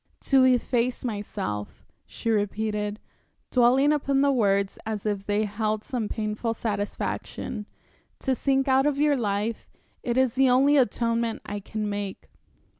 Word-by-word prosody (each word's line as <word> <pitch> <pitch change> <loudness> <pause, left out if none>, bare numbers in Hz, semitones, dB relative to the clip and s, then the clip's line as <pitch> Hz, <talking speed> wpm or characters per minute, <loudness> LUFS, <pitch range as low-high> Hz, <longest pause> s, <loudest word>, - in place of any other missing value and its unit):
"To 270 -2 +4
efface 250 -1 +1
myself," 105 - -4 0.2
she 230 - -3
repeated, 210 0 -1 0.5
dwelling 260 +4 +4
upon 275 -2 +1
the 280 0 +4
words 200 -6 +1
as 220 -2 -4
if 205 -2 -2
they 205 +1 +1
held 215 +1 -1
some 235 -5 -3
painful 220 +1 -2
satisfaction, 210 0 -4 0.5
"to 265 - +1
sink 270 +2 +1
out 265 +1 +4
of 290 -2 0
your 295 0 +3
life 215 -1 -2 0.3
it 240 -1 -1
is 260 -3 +3
the 265 0 +4
only 270 +4 +5
atonement 235 -2 +1
I 205 - -4
can 215 +1 -4
make." 205 -1 -5
225 Hz, 140 wpm, -26 LUFS, 210-260 Hz, 0.5 s, only